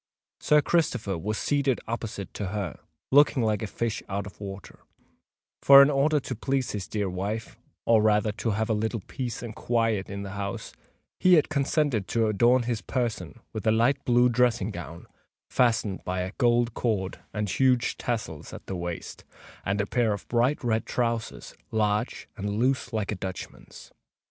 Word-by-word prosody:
Sir 150 Hz, -1 st, +4 dB
Christopher 125 Hz, -, +1 dB
was 105 Hz, +6 st, -3 dB
seated 140 Hz, -3 st, +1 dB
opposite 115 Hz, -4 st, -5 dB
to 100 Hz, -, -4 dB
her, 100 Hz, -4 st, -4 dB, 0.3 s
looking 135 Hz, -3 st, +5 dB
like 105 Hz, -2 st, +1 dB
a 110 Hz, -, -2 dB
fish 115 Hz, +1 st, -2 dB
out 100 Hz, 0 st, -2 dB
of 100 Hz, 0 st, -12 dB
water; 95 Hz, -2 st, -8 dB, 0.8 s
for, 140 Hz, 0 st, +10 dB
in 140 Hz, -, +3 dB
order 145 Hz, +2 st, +3 dB
to 130 Hz, -, -5 dB
please 130 Hz, +3 st, -1 dB
his 100 Hz, -3 st, -4 dB
dear 105 Hz, -2 st, -2 dB
wife—or 105 Hz, +3 st, -1 dB
rather, 105 Hz, 0 st, +3 dB
to 110 Hz, +2 st, -3 dB
have 110 Hz, +1 st, 0 dB
a 110 Hz, -, +1 dB
little 110 Hz, +1 st, -1 dB
peace 125 Hz, +4 st, -5 dB
and 115 Hz, -2 st, -6 dB
quiet 115 Hz, -4 st, 0 dB
in 100 Hz, 0 st, -5 dB
the 100 Hz, -, -6 dB
house—he 100 Hz, -, -1 dB
had 155 Hz, -, +3 dB
consented 140 Hz, -, 0 dB
to 115 Hz, -1 st, +1 dB
adorn 120 Hz, +4 st, +3 dB
his 115 Hz, -2 st, -2 dB
person 120 Hz, -2 st, -3 dB
with 110 Hz, -1 st, -4 dB
a -, -, +6 dB
light 120 Hz, +5 st, +2 dB
blue 120 Hz, 0 st, +4 dB
dressing 120 Hz, -4 st, +2 dB
gown, 85 Hz, -3 st, -8 dB, 0.5 s
fastened 115 Hz, -5 st, +1 dB
by 90 Hz, 0 st, -2 dB
a 90 Hz, +1 st, -3 dB
gold 120 Hz, -1 st, +3 dB
cord 100 Hz, -6 st, -1 dB
and 105 Hz, -1 st, -2 dB
huge 125 Hz, +3 st, +2 dB
tassels 110 Hz, -, -4 dB
at -, -, -9 dB
the 95 Hz, -, -4 dB
waist, 85 Hz, -1 st, -6 dB, 0.4 s
and 100 Hz, +2 st, -1 dB
a 100 Hz, -, +1 dB
pair 115 Hz, 0 st, +1 dB
of 100 Hz, -, -7 dB
bright 125 Hz, +5 st, +1 dB
red 115 Hz, -2 st, 0 dB
trowsers, 115 Hz, -2 st, -2 dB, 0.2 s
large 105 Hz, +1 st, -1 dB
and 100 Hz, +1 st, -3 dB
loose 130 Hz, +1 st, +1 dB
like 110 Hz, -3 st, -2 dB
a -, -, -2 dB
Dutchman's. 95 Hz, -1 st, -8 dB
110 Hz, 170 wpm, -27 LUFS, 100-125 Hz, 0.8 s, for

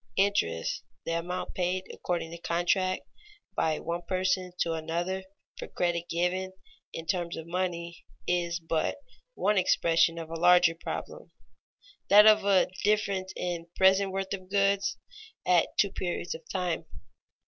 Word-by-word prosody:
_Interest, 85 Hz, -, +1 dB, 0.2 s
the -, -, -2 dB
amount 180 Hz, +2 st, -4 dB
paid 185 Hz, +1 st, -1 dB
according 170 Hz, -2 st, -3 dB
to 170 Hz, -, -7 dB
contract 180 Hz, +2 st, 0 dB, 0.5 s
by 155 Hz, -1 st, +1 dB
one 170 Hz, +1 st, -3 dB
person 185 Hz, 0 st, 0 dB
to 165 Hz, -, +1 dB
another 170 Hz, +4 st, -2 dB, 0.4 s
for -, -, -5 dB
credit 175 Hz, -1 st, -1 dB
given 185 Hz, +2 st, -1 dB, 0.4 s
in 165 Hz, -, -6 dB
terms 175 Hz, -1 st, -2 dB
of 160 Hz, -, -6 dB
money, 170 Hz, -1 st, -3 dB, 0.2 s
is 175 Hz, -1 st, 0 dB
but 160 Hz, -1 st, -1 dB, 0.4 s
one 210 Hz, -1 st, +2 dB
expression 165 Hz, -2 st, +3 dB
of 165 Hz, -1 st, -7 dB
a 165 Hz, -, -4 dB
larger 175 Hz, -1 st, +6 dB
problem, 480 Hz, -, -7 dB, 0.8 s
that 210 Hz, +1 st, +9 dB
of 215 Hz, 0 st, +7 dB
the 195 Hz, -2 st, +3 dB
difference 200 Hz, -3 st, +1 dB
in 170 Hz, -2 st, -3 dB
present 190 Hz, +1 st, +4 dB
worth 195 Hz, 0 st, -3 dB
of 185 Hz, -2 st, -7 dB
goods 200 Hz, 0 st, +2 dB, 0.5 s
at 175 Hz, -2 st, +4 dB
two 200 Hz, -, +3 dB
periods 175 Hz, -1 st, -3 dB
of 160 Hz, -1 st, -11 dB
time. 180 Hz, -3 st, -2 dB
180 Hz, 140 wpm, -29 LUFS, 170-190 Hz, 0.8 s, that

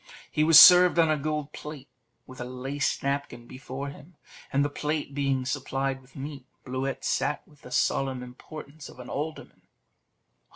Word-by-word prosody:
He 155 Hz, -, +1 dB
was 155 Hz, -1 st, +9 dB
served 180 Hz, -1 st, +9 dB
on 165 Hz, -2 st, +4 dB
a -, -, +3 dB
gold 150 Hz, 0 st, -3 dB
plate, 150 Hz, -3 st, -9 dB, 0.4 s
with 130 Hz, -1 st, -11 dB
a -, -, -4 dB
laced 130 Hz, +3 st, -3 dB
napkin 140 Hz, -4 st, -3 dB
before 130 Hz, +3 st, -7 dB
him; 150 Hz, +4 st, -14 dB, 0.4 s
and 140 Hz, +1 st, +2 dB
the -, -, -1 dB
plate 150 Hz, -1 st, -3 dB
being 135 Hz, -2 st, 0 dB
supplied 135 Hz, 0 st, -2 dB
with 130 Hz, +3 st, -23 dB
meat, 140 Hz, -2 st, -8 dB, 0.2 s
Bluet 130 Hz, 0 st, -3 dB
sat 150 Hz, -, -1 dB
with 150 Hz, -2 st, -22 dB
the -, -, -12 dB
solemn 130 Hz, 0 st, 0 dB
importance 140 Hz, +4 st, -11 dB
of -, -, -15 dB
an 125 Hz, -, -9 dB
alderman. 155 Hz, +2 st, -6 dB
140 Hz, 165 wpm, -27 LUFS, 130-150 Hz, 0.4 s, was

